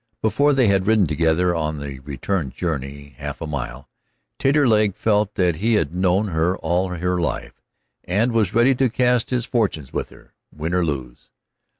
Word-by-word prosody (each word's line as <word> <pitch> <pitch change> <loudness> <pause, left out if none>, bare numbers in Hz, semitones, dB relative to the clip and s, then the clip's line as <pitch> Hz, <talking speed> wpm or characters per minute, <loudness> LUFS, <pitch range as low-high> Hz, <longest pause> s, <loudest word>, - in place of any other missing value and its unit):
Before 140 +7 +3
they 135 -2 +3
had 100 -2 +2
ridden 110 -3 +4
together 80 +3 +1
on 80 -2 -2
the 70 -2 -7
return 70 +4 -3
journey 70 -2 -5
half - - -5
a - - -4
mile, 70 -2 -5 0.5
Taterleg 115 -8 +3
felt 105 -1 +1
that 90 -4 +1
he 110 +6 +2
had 80 -6 0
known 95 +3 +1
her 85 +2 0
all 90 +3 0
her 90 0 -1
life, 85 - -4 0.4
and 105 +7 +1
was 110 -5 +1
ready 120 +3 +5
to 130 0 +1
cast 125 0 +1
his 125 -2 0
fortunes 100 - -1
with - - -3
her, - - -19 0.2
win 80 +3 -4
or 90 -1 +2
lose. 65 -6 -5
90 Hz, 175 wpm, -22 LUFS, 80-110 Hz, 0.5 s, ready